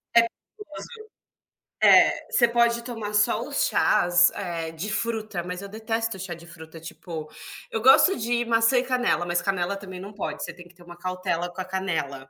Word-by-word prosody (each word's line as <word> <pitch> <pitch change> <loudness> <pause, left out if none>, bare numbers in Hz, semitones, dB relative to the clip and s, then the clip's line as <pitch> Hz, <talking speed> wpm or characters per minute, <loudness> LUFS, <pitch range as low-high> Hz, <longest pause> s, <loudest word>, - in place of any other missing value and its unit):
É, 235 - +9 0.3
tipo 420 -1 -13
assim, 460 -2 -9 0.8
eh, - - +5
você 240 - +4
pode 235 0 +2
tomar 225 -4 -6
só 210 0 +2
os - - +1
chás, 175 0 +4
eh, 165 -2 -4
de 165 +6 -5
fruta, 220 -5 -2
mas 180 +1 -6
eu 200 - -7
detesto 225 0 -3
chá 185 -1 -6
de 170 0 -13
fruta 160 -1 -12
tipo, 160 -1 -8 0.4
eu 225 - -3
gosto 270 - +6
de 240 +1 0
maçã 230 +2 +3
e 245 - +3
canela, 250 -8 0
mas 175 0 0
canela 195 -1 -1
também 190 -2 -9
não 200 +3 -9
pode, 205 - -5
você - - -6
tem 175 +1 -14
que 175 - -22
ter 175 - -17
uma 175 0 -13
cautela 185 -1 -3
com - - -11
a - - -5
canela. 160 -8 -3
190 Hz, 195 wpm, -25 LUFS, 175-230 Hz, 0.8 s, É